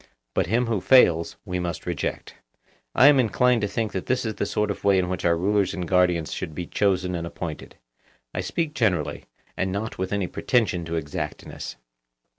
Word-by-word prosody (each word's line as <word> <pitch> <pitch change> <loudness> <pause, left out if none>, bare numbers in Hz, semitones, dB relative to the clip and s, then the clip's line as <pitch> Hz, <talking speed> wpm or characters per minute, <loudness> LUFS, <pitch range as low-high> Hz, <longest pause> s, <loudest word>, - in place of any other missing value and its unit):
But - - +1
him 120 +6 +2
who 110 -5 -1
fails, 85 -11 +5
we 90 -2 -2
must 90 0 -4
reject. 85 -4 -3 0.6
I 125 - +6
am 145 -1 +7
inclined 125 0 +3
to 105 - +1
think 110 +1 -2
that 95 - -4
this 130 -1 0
is 110 - -1
the - - -2
sort 105 -1 0
of - - -7
way 100 -1 +4
in 90 -1 +1
which 90 - -3
our 85 -1 +3
rulers 100 +2 +1
and 90 -2 -4
guardians 90 -3 +2
should 80 - -5
be 90 - -4
chosen 90 -1 0
and 85 -1 -3
appointed. 85 -2 -7 0.6
I - - -2
speak 165 -3 -2
generally, 95 - 0 0.3
and 95 - -1
not 105 +2 -4
with 95 0 -2
any 100 -2 0
pretension 95 -3 0
to 80 +1 -3
exactness. 75 -5 -5
95 Hz, 195 wpm, -25 LUFS, 85-110 Hz, 0.6 s, am